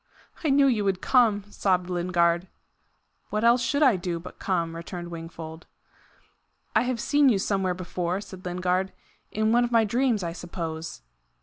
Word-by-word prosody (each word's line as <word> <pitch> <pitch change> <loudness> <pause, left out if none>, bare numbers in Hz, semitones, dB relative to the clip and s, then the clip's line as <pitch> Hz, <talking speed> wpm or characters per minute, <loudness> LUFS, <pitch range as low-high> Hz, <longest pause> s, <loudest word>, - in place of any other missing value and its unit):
"I 310 - +1
knew 275 0 +5
you 235 -6 +2
would 195 -2 0
come," 225 -5 +3
sobbed 185 -3 +1
Lingard. 175 0 +1 0.8
"What 215 +1 -1
else 235 +1 +5
should 280 +5 +1
I 255 -8 +5
do 175 -1 -3
but 175 - -11
come?" 170 -3 -1
returned 175 +1 -7
Wingfold. 165 -1 -8 1.1
"I - - +5
have 250 -1 -1
seen 290 +3 +4
you 220 - +3
somewhere 190 -2 0
before," 180 0 -3
said 190 -2 -10
Lingard 180 +1 -1 0.4
"in 215 +1 +1
one 240 +1 +4
of 240 - -2
my 230 -1 +5
dreams, 235 -1 +1
I 170 -1 -3
suppose." 165 -2 -6
185 Hz, 165 wpm, -26 LUFS, 175-230 Hz, 1.1 s, knew